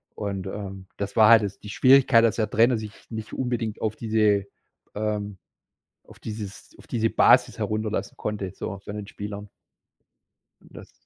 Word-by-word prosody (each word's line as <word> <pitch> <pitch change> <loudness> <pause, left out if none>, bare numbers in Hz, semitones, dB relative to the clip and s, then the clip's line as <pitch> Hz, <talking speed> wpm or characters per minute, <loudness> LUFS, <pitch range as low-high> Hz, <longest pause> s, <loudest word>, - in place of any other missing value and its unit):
und, 100 -2 -4
ähm, 95 -1 -7
das 100 0 -4
war 110 -2 +6
halt 115 -1 +8
das 100 -1 -5
die 105 - -10
Schwierigkeit, 130 0 +5
dass 115 - +3
der 110 -2 0
Trainer 115 +3 +3
sich 110 -1 -7 0.2
nicht 110 -1 -7
unbedingt 120 -4 -3
auf 110 -1 -1
diese, 105 -3 +1 0.5
ähm 105 -1 -3 0.7
auf - - -17
dieses 105 -2 -8
auf - - -17
diese 115 -1 0
Basis - - +4
herunterlassen 110 0 -2
konnte, 100 -3 -4
so 100 -2 -6
von 100 +1 -8
den 105 -1 -6
Spielern. 105 0 -7 1.1
Und - - -20
das. - - -12
105 Hz, 165 wpm, -25 LUFS, 100-110 Hz, 1.1 s, halt